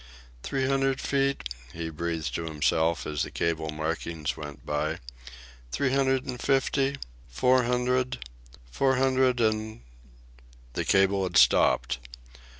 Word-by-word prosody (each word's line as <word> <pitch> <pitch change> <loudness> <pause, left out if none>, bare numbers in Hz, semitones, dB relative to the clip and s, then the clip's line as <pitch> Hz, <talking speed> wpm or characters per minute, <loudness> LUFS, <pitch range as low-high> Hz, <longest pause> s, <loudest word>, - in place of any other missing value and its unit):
"Three 135 - -1
hundred 135 0 +1
feet," 140 0 0 0.3
he 80 -1 -5
breathed 80 0 -3
to 85 - -3
himself, 80 +1 +1
as 75 -2 -2
the - - -1
cable 80 -2 -1
markings 80 0 -3
went 75 -1 -9
by, 75 +1 -1 0.7
"three 130 - 0
hundred 135 -1 +2
and 125 -1 -5
fifty, 135 0 +1 0.3
four 125 - +3
hundred; 125 +1 0 0.5
four 130 - +2
hundred 130 -1 +2
and 110 - 0 0.5
" - - -25
The - - -2
cable 95 0 +3
had 95 - 0
stopped. - - +4
110 Hz, 130 wpm, -27 LUFS, 80-130 Hz, 0.7 s, stopped